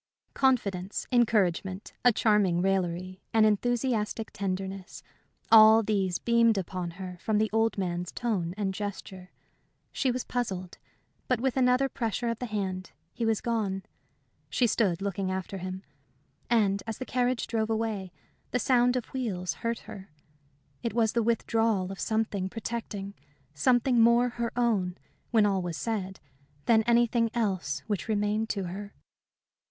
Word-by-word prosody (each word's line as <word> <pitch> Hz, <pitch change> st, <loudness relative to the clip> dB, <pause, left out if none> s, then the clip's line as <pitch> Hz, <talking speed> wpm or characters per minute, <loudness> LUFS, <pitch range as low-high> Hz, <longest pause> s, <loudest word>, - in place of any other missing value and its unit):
Confidence, 200 Hz, -8 st, 0 dB
encouragement, 200 Hz, -5 st, +1 dB
a 245 Hz, -, +7 dB
charming 210 Hz, -6 st, +2 dB
raillery, 185 Hz, 0 st, -1 dB
an 220 Hz, -1 st, +6 dB
enthusiastic 225 Hz, 0 st, 0 dB
tenderness 190 Hz, -1 st, -4 dB, 0.5 s
all 220 Hz, 0 st, +8 dB
these 195 Hz, -4 st, 0 dB
beamed 235 Hz, -2 st, +3 dB
upon 185 Hz, -1 st, -3 dB
her 180 Hz, -2 st, -7 dB
from 215 Hz, -1 st, +1 dB
the 215 Hz, 0 st, +1 dB
old 225 Hz, 0 st, +2 dB
man's 180 Hz, -2 st, -2 dB
tone 190 Hz, -8 st, -2 dB
and 195 Hz, -2 st, -1 dB
gesture. 190 Hz, -2 st, -6 dB, 0.6 s
She 265 Hz, -, 0 dB
was 250 Hz, 0 st, -1 dB
puzzled. 190 Hz, -7 st, -4 dB, 0.5 s
But 250 Hz, -2 st, +1 dB
with 260 Hz, +1 st, 0 dB
another 255 Hz, +1 st, +3 dB
pressure 235 Hz, -1 st, -2 dB
of 230 Hz, -, -3 dB
the 250 Hz, -, -3 dB
hand 190 Hz, -3 st, -3 dB, 0.2 s
he 230 Hz, -, -2 dB
was 220 Hz, -2 st, +1 dB
gone. 205 Hz, -5 st, -1 dB, 0.7 s
She 250 Hz, -, +2 dB
stood 195 Hz, -6 st, +1 dB
looking 195 Hz, -1 st, -2 dB
after 190 Hz, +1 st, -4 dB
him. 185 Hz, +1 st, -6 dB, 0.7 s
And 200 Hz, -4 st, +2 dB
as 225 Hz, -, -4 dB
the 255 Hz, -, -5 dB
carriage 250 Hz, -1 st, 0 dB
drove 225 Hz, -1 st, -1 dB
away, 220 Hz, -4 st, -2 dB, 0.4 s
the -, -, 0 dB
sound 245 Hz, 0 st, +3 dB
of 250 Hz, -, 0 dB
the -, -, -23 dB
wheels 185 Hz, -10 st, -2 dB
hurt 230 Hz, -1 st, -2 dB
her. 205 Hz, -3 st, -10 dB, 0.7 s
It 230 Hz, -1 st, -3 dB
was 225 Hz, -2 st, +2 dB
the 235 Hz, -, +2 dB
withdrawal 225 Hz, -4 st, +1 dB
of 195 Hz, -, -8 dB
something 220 Hz, -4 st, -1 dB
protecting 210 Hz, -3 st, -5 dB, 0.4 s
something 245 Hz, -, +3 dB
more 235 Hz, +2 st, +5 dB
her 235 Hz, -1 st, -3 dB
own, 200 Hz, -7 st, +1 dB, 0.3 s
when 220 Hz, -3 st, +4 dB
all 195 Hz, -2 st, +1 dB
was 175 Hz, -2 st, -4 dB
said, 195 Hz, -4 st, -3 dB, 0.5 s
than 225 Hz, -2 st, +5 dB
anything 235 Hz, -1 st, +3 dB
else 200 Hz, -6 st, -1 dB
which 205 Hz, -4 st, -3 dB
remained 215 Hz, +1 st, 0 dB
to 200 Hz, -2 st, -2 dB
her. 200 Hz, +3 st, -7 dB
215 Hz, 145 wpm, -28 LUFS, 190-235 Hz, 0.7 s, all